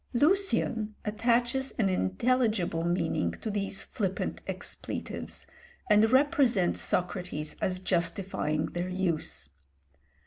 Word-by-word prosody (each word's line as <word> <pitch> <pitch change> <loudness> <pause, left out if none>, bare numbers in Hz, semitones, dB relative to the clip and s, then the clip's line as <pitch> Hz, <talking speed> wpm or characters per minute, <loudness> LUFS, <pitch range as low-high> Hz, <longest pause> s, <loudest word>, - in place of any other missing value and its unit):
Lucian 255 - +2
attaches 240 +5 +1
an 215 -5 +3
intelligible 190 - +1
meaning 170 - +1
to 215 - -5
these 200 -1 -1
flippant 195 -3 -2
expletives, - - -5 0.5
and 215 +2 +6
represents 260 -8 +3
Socrates 180 -4 -2
as 185 -1 0
justifying 170 -3 0
their 175 +1 -3
use. 170 - -1
195 Hz, 95 wpm, -29 LUFS, 175-235 Hz, 0.5 s, and